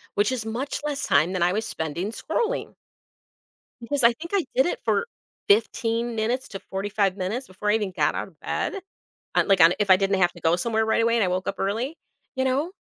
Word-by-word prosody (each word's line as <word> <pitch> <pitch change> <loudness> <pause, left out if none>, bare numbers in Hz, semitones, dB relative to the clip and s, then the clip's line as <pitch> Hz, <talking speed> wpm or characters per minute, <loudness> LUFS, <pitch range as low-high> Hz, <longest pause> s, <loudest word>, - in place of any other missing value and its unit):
which 205 +1 +2
is 235 -4 -3
much 250 +6 -3
less 290 -2 -2
time 155 +5 +3
than 185 - -2
I 180 +1 +3
was 220 +2 -1
spending 160 +6 -3
scrolling. 445 - -2 1.1
Because 270 +4 -2
I 235 - +7
think 335 +8 -9
I 380 - +2
did 265 - +4
it - - -1
for 475 - +1 0.4
15 230 +2 +1
minutes 235 +4 -1
to 195 - -7
45 195 0 0
minutes 210 +8 -3
before 210 +3 -3
I - - +4
even 205 -4 -1
got - - +2
out - - -3
of - - -24
bed, - - -2 0.6
uh, - - +5
like, 195 -2 +3 0.2
if 205 - 0
I 185 - +8
didn't 195 0 +1
have 175 0 +4
to 175 - -14
go 165 +1 +3
somewhere 220 +4 0
right 220 +1 +2
away, 230 +1 +2
and 225 - +3
I - - +2
woke 185 +1 -2
up - - -1
early, 230 +11 -2 0.4
you 260 - 0
know, 275 +7 0
220 Hz, 220 wpm, -25 LUFS, 190-245 Hz, 1.1 s, I